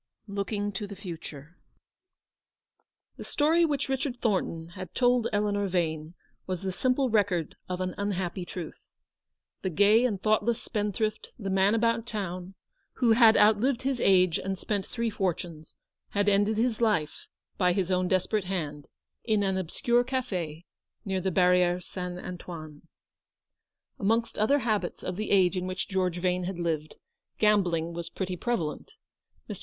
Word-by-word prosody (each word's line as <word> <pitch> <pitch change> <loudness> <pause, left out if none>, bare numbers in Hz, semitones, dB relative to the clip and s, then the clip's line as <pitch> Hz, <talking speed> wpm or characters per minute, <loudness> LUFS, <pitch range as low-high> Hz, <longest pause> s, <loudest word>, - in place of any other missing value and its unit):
LOOKING 205 +1 -2
TO 205 +1 -4
THE 200 - -8
FUTURE. 165 -4 -9 1.6
The - - -7
story 325 +3 +3
which 290 -3 0
Kichard 265 -1 -2
Thornton 170 -7 -1
had 185 0 -9
told 245 -2 +3
Eleanor 205 -1 +1
Vane 165 -3 -2 0.3
was 185 0 -3
the 190 - -1
simple 255 +5 +1
record 190 -7 +1
of 180 0 -3
an 185 -1 -2
un 200 0 0
happy 185 0 -3
truth. 175 -2 -7 0.8
The 190 - -1
gay 205 +6 +5
and 210 -6 0
thoughtless 215 +3 +2
spend 210 -2 -2
thrift, 215 -1 -2
the 195 -4 -4
man 195 +3 +3
about 230 0 +1
town, 190 -3 -5 0.4
who 240 -3 +2
had 225 -1 +7
outlived 225 +5 +4
his 265 -2 0
age 185 -3 +4
and 195 0 -3
spent 200 0 -2
three 235 -2 -2
fortunes, 170 -5 -3 0.3
had 205 0 0
ended 205 +2 +3
his 235 0 +1
life, 205 -10 0 0.3
by 180 -2 +4
his 185 0 0
own 185 0 +2
desperate 185 +2 +1
hand, 150 -6 -4 0.4
in 215 -3 +1
an 190 -1 +1
obscure 235 +7 +1
cafe 180 - -3 0.4
near 190 -2 -1
the 190 - 0
Barriere 180 0 +3
Saint 180 0 -6
Antoine. 165 -4 -8 1.1
Amongst 225 +3 +1
other 220 +7 +4
habits 210 -6 -1
of 185 - -3
the 215 +3 -3
age 190 -2 +4
in 185 0 -2
which 185 +3 -3
George 185 -3 0
Vane 180 0 0
had 185 0 -4
lived, 160 -3 -2 0.4
gambling 175 -6 +2
was 170 0 -5
pretty 185 0 -3
pre 240 +7 0
valent. 155 -7 -4 0.6
Mr. - - -6
195 Hz, 155 wpm, -28 LUFS, 180-215 Hz, 1.6 s, had